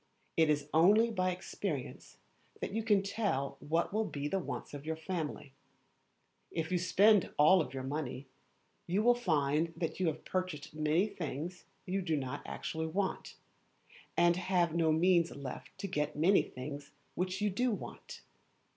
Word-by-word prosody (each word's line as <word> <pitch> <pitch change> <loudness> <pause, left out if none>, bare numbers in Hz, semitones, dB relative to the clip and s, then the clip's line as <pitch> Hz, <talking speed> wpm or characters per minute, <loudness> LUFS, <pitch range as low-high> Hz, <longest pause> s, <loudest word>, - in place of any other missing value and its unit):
It 160 -1 +4
is 145 -1 +1
only 210 +8 +5
by 185 -4 +1
experience 180 -5 -5 0.4
that - - -3
you 225 - 0
can 210 -3 +3
tell 195 -10 -1
what 165 +5 0
will 220 +1 +2
be 145 -5 -3
the 195 +6 0
wants 175 - -6
of 145 -1 -7
your 160 +1 -2
family. 160 -4 -4 1.0
If 160 0 -3
you 180 - +2
spend 195 +3 +4
all 155 +1 +5
your 130 -1 -5
money, 135 -1 -4 0.6
you 190 +5 +1
will 245 +1 +6
find 160 -7 +1 0.2
you 185 - +2
have 155 -1 -3
purchased 185 -7 -3
many 155 +4 +2
things 170 -2 -5 0.2
you 195 +1 -1
do 165 -4 0
not 130 -2 -4
actually 160 0 -3
want, 190 +4 -2 0.8
and 175 0 +5
have 180 -3 +1
no 165 -1 +3
means 170 +1 +4
left 140 -3 -8
to 200 - -4
get 150 -5 -1
many 175 +7 +5
things 140 +2 -7 0.2
which 185 +1 -2
you 210 -1 +1
do 250 +7 +1
want. 210 - -6
170 Hz, 155 wpm, -33 LUFS, 150-190 Hz, 1.0 s, will